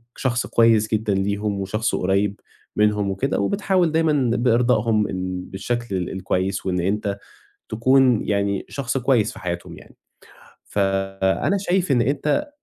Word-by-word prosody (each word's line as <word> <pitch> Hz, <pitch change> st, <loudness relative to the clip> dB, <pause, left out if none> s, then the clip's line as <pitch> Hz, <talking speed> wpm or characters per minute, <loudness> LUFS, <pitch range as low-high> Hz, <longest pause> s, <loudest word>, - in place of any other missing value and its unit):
شخص 120 Hz, -2 st, -1 dB
كويس 115 Hz, -1 st, +3 dB
جدًا 110 Hz, -1 st, +1 dB
ليهُم، 100 Hz, +1 st, -1 dB
وشخص 110 Hz, +3 st, -1 dB
قريّب 100 Hz, +2 st, 0 dB, 0.4 s
منهُم 105 Hz, -1 st, +2 dB
وكده، 130 Hz, +8 st, -1 dB
وبتحاول 190 Hz, -4 st, +1 dB
دايمًا 150 Hz, -5 st, +2 dB
بإرضائهم 115 Hz, -2 st, +2 dB, 0.5 s
بالشكل 120 Hz, +1 st, -3 dB
ال 90 Hz, -1 st, -2 dB
الكويّس 95 Hz, +1 st, -2 dB
وإن 90 Hz, -1 st, 0 dB
أنت 100 Hz, +2 st, -1 dB, 0.5 s
تكُون 125 Hz, +1 st, +3 dB
يعني 100 Hz, -1 st, 0 dB
شخص 135 Hz, -1 st, -3 dB
كويّس 120 Hz, -4 st, +2 dB
في -, -, -11 dB
حياتهُم 85 Hz, -1 st, -5 dB
يعني. -, -, -17 dB, 0.7 s
فأنا 95 Hz, -, 0 dB
شايف 185 Hz, -4 st, 0 dB
إن 120 Hz, -3 st, +3 dB
أنت 150 Hz, -, 0 dB
110 Hz, 130 wpm, -22 LUFS, 100-130 Hz, 0.7 s, كويس